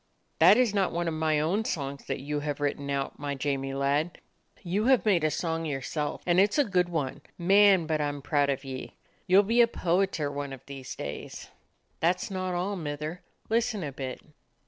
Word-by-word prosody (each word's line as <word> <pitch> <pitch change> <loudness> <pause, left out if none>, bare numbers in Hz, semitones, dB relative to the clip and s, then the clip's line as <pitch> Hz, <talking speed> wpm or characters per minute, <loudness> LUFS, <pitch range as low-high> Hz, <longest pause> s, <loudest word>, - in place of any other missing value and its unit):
"That 180 +7 +8
is 245 -5 +3
not 195 -2 +1
one 170 0 -2
of 165 - -1
!my 155 -1 +1
own 175 +9 +1
songs 140 -8 -4
that - - -2
you 145 +2 -2
have 145 -1 -3
written 145 -1 -2
out, 140 -1 -2
my 145 0 -3
Jamie 135 0 -2
lad. 145 +5 0 0.5
You 195 +4 0
have 260 -2 +4
made 185 -7 +3
a 155 - +3
song 165 +1 -2
yourself. 145 0 -3
And 175 0 +3
it 200 +2 +4
's - - 0
a 290 - +5
good 180 -6 +1
one. 150 -6 -3 0.2
Man, 195 0 +5
but 155 -1 0
I 145 - +1
'm 145 -1 -5
proud 145 -2 +2
of 140 0 -2
ye. 130 -1 -7 0.3
You 190 +2 +7
'll - - -5
be 230 +4 +4
a 235 - +6
poeter 175 -7 0
one 140 -1 -4
of 130 - -11
these 135 -1 -8
days." 70 +1 -7 0.5
"That 175 +2 +2
is - - -6
not 185 -1 -2
all, 190 +3 -1
Mither. 155 0 -5 0.3
Listen 225 -3 0
a 145 - -4
bit." 130 -1 -6
160 Hz, 215 wpm, -28 LUFS, 140-185 Hz, 0.5 s, That